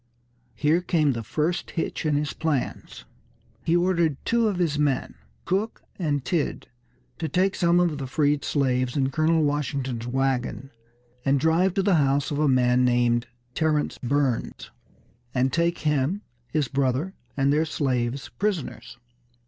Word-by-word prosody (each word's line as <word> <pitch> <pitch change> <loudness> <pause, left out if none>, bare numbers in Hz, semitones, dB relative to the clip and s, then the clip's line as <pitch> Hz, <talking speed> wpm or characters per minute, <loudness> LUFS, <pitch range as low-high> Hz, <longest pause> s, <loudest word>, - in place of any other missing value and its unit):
Here 155 +4 +2
came 160 -5 +2
the 115 - -4
first 155 - -1
hitch 165 -1 -3
in 150 - +2
his 145 0 -1
plans. 155 -5 -3 0.6
He 165 - +2
ordered 170 -4 +2
two 230 -1 +2
of 200 -4 -1
his 160 -5 0
men, 145 -3 0 0.3
Cook 200 +5 -1 0.2
and 145 -6 -1
Tidd, 165 -1 -1 0.5
to 160 - -2
take 185 +6 +2
some 170 0 +3
of 170 -5 +1
the 135 - -4
freed 145 +1 +1
slaves 130 -2 0
in 135 -1 +1
Colonel 160 +2 +2
Washington's 140 -5 -2
wagon, 135 +1 -1 0.5
and 140 0 +2
drive 165 +5 +2
to 195 - +2
the 190 -3 +4
house 140 +1 +1
of 145 - -1
a 155 - +3
man 125 -1 +3
named 120 -1 +2 0.3
Terrence 155 -2 0
Burns, 130 -1 -1 0.6
and 130 +1 +1
take 170 0 +1
him, 150 +6 0 0.2
his 150 -1 0
brother 140 +7 0 0.2
and 135 +1 +3
their 155 +2 +2
slaves 130 -4 -1
prisoners. 195 -11 -3
145 Hz, 150 wpm, -25 LUFS, 130-165 Hz, 0.6 s, the